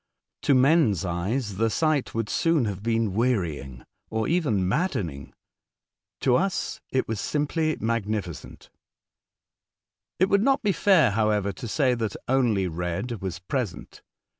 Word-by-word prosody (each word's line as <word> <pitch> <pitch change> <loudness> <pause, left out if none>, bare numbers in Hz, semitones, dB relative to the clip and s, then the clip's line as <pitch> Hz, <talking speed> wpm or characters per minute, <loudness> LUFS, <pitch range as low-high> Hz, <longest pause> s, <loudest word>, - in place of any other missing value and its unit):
To 140 - +3
men's 130 - +3
eyes 95 +5 -2
the 115 +1 +2
sight 155 0 0
would 115 -1 -1
soon 165 0 +2
have 100 -3 -4
been 115 -2 0
wearying, 85 - -1 0.3
or 110 0 -1
even 140 - +1
maddening; 95 - -2 0.9
to 125 - +3
us 195 0 -2
it 130 - 0
was 110 -2 -3
simply 155 +5 -1
magnificent. 110 -6 -3 1.5
It 185 - +3
would 200 0 +3
not 270 +3 +2
be 205 - +3
fair, 165 - +4
however, 105 -1 +1
to 115 - -8
say 130 +2 +2
that 110 -4 -2
only 120 -7 +2
red 90 +7 -4
was 95 -2 -4
present. 105 +2 -4
115 Hz, 135 wpm, -25 LUFS, 95-145 Hz, 1.5 s, fair